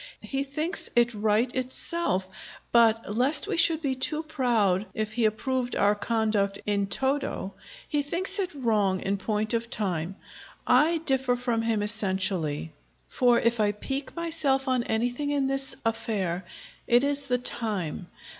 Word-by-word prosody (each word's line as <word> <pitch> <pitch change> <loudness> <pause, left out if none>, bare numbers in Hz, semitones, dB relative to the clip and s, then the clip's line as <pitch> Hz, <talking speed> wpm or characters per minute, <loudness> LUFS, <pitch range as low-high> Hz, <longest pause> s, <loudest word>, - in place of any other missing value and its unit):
He 275 0 -2
thinks 305 +6 -2
it 240 0 +3
right 215 +3 +1
itself; 255 - 0 0.4
but 225 -2 +3
lest 265 - +3
we 415 -2 -2
should 330 -1 +4
be 275 -2 +1
too 300 +4 -1
proud 230 - +1
if 215 0 -2
he 230 +1 +1
approved 245 +3 -1
our 205 +1 +3
conduct 210 -2 0
in 200 -1 0
toto, 265 -4 -1 0.3
he 295 - 0
thinks 345 +8 -2
it 375 -2 0
wrong 210 -7 +1
in 200 +1 -1
point 215 +2 -2
of 230 0 -1
time. 185 -4 -2 0.5
I 330 +3 +4
differ 265 -2 +2
from 240 -2 -1
him 225 -2 0
essentially; 190 -7 -1 0.4
for 245 -2 +3
if 235 0 +1
I 205 -1 +2
pique 270 +6 -3
myself 315 -5 0
on 255 -1 +2
anything 245 +6 -1
in 285 -2 +1
this 270 0 -1
affair, 200 -6 -2 0.4
it 240 +2 +4
is 285 0 -1
the 250 -1 +2
time. 210 -9 -3
235 Hz, 150 wpm, -27 LUFS, 210-270 Hz, 0.5 s, should